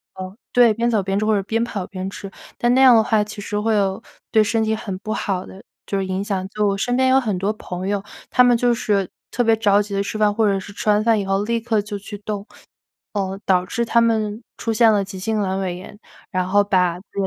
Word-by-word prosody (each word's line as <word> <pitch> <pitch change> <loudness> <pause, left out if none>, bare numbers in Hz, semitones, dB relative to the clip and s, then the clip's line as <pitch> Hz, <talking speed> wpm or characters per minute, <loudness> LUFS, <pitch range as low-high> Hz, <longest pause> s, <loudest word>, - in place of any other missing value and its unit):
呃， 185 +1 -7 0.2
对， 240 -3 +5
边 235 +2 0
走 215 -3 +2
边 195 +1 -2
吃， 215 - 0
或 220 - +2
者 200 - +2
边 225 +3 -1
跑 200 -6 -4
边 185 0 -5
吃。 195 0 -8 0.3
但 240 0 +2
那 260 - +4
样 260 -2 +8
的 - - +6
话， 215 -1 +2
其 210 0 -9
实 205 0 -4
会 220 +2 +1
有 195 -2 0 0.3
对 220 -1 +4
身 225 +1 0
体 220 0 +1
很 200 -3 -5
不 215 +3 -4
好 190 -4 -2
的 190 - -13 0.2
就 200 - -2
是 195 - -1
影 190 0 -2
响。 195 -2 -2
就 210 +1 0
我 195 0 0
身 245 +5 0
边 260 0 +3
有 260 +1 +5
很 220 -8 0
多 195 +4 -1
朋 185 -3 -6
友， 200 -1 -1 0.3
他 250 - +5
们 245 -1 +4
就 245 0 +2
是 205 -5 0 0.2
特 245 - -1
别 225 -1 +4
着 205 -2 +3
急 205 0 -6
地 200 - 0
吃 210 - -4
饭， 210 -1 +3
或 220 +1 +1
者 195 -1 +1
是 200 +2 -10
吃 210 - -3
完 210 0 +4
饭 225 -1 +3
以 200 - -3
后 195 +1 0
立 230 +2 0
刻 225 -2 0
就 205 0 -6
去 205 +1 -9
动， 205 -1 -5 0.7
呃， 195 -2 -2
导 180 -2 +3
致 235 +5 -2
他 235 0 +3
们 220 -1 0 0.2
出 225 - -2
现 225 0 +5
了 205 -2 +2
急 195 -1 -8
性 220 +4 -1
阑 190 -1 -1
尾 185 -2 -2
炎， 200 +3 -12 0.3
然 185 -1 -1
后 205 +2 +4
把 180 -4 +2 0.2
那 200 - -2
205 Hz, 285 characters per minute, -21 LUFS, 195-225 Hz, 0.7 s, 样